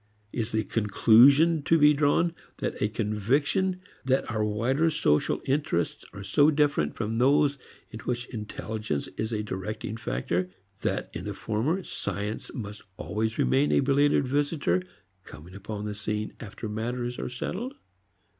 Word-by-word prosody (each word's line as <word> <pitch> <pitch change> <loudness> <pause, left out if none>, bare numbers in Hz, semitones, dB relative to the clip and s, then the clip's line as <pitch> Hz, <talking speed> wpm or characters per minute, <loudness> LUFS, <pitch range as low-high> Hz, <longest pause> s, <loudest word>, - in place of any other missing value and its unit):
Is 115 0 -2
the 110 0 +1
conclusion 125 - +5
to 165 +3 +3
be 150 -1 +6
drawn 150 +4 +2 0.3
a 105 - -1
conviction 125 - 0 0.2
that 130 -2 +1
our 110 -2 0
wider 120 +10 +1
social 75 - +1
interests 130 - 0
are 100 -1 -8
so 145 +8 +4
different 145 - +1
from 110 0 -2
those 140 +2 +3 0.3
in 110 - -7
which 120 +1 -3
intelligence 110 - -4
is 110 +1 -2
a 105 -1 -1
directing 105 +2 -4
factor 90 - -2 0.3
that - - -2
in - - -6
the - - -4
former 145 - -1
science 105 -6 -4
must 105 -2 -6 0.2
always 110 +1 -2
remain 140 +2 +3
a - - +4
belated 140 0 +3
visitor 140 - +1 0.4
coming 80 +5 -12
upon 105 +1 -6
the 105 - -3
scene 105 +1 -3
after 110 +1 -7
matters 120 +3 -3
are - - -3
settled? 190 - -4
115 Hz, 145 wpm, -27 LUFS, 105-145 Hz, 0.4 s, be